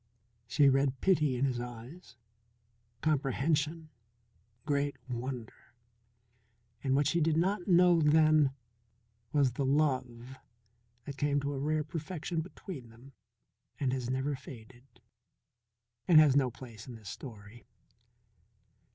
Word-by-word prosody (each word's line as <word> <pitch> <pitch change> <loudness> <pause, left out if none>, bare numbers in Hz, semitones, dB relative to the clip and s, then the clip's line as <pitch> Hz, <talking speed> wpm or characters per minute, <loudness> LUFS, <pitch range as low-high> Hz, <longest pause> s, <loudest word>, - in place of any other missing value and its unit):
She 140 +3 +4
read 135 -1 +2
pity 155 -8 +2
in 125 +2 +1
his 125 -3 -1
eyes, 120 +6 -9 0.9
comprehension, 155 +2 0 0.8
great 145 -2 0
wonder, 125 -1 -7 1.1
and 135 -1 +1
what 145 +1 +2
she 170 +4 +1
did 160 0 +2
not 180 +2 0
know 175 -2 +5
then 155 -1 +4 0.8
was 140 -4 +3
the 130 +4 -3
love 130 -3 -1 0.7
that 140 -1 -7
came 145 0 +1
to 140 +1 -2
a 135 - -4
rare 155 +2 0
perfection 165 +1 -4
between 155 - -9
them 120 +4 -16 0.7
and 130 -3 0
has 125 -2 -3
never 130 +3 -1
faded 125 0 -14 1.1
and 165 -4 +8
has 150 -4 +5
no 135 -3 +3
place 115 -3 -12
in 125 - -8
this 110 -3 -10
story. 110 -2 -11
140 Hz, 120 wpm, -31 LUFS, 125-155 Hz, 1.1 s, and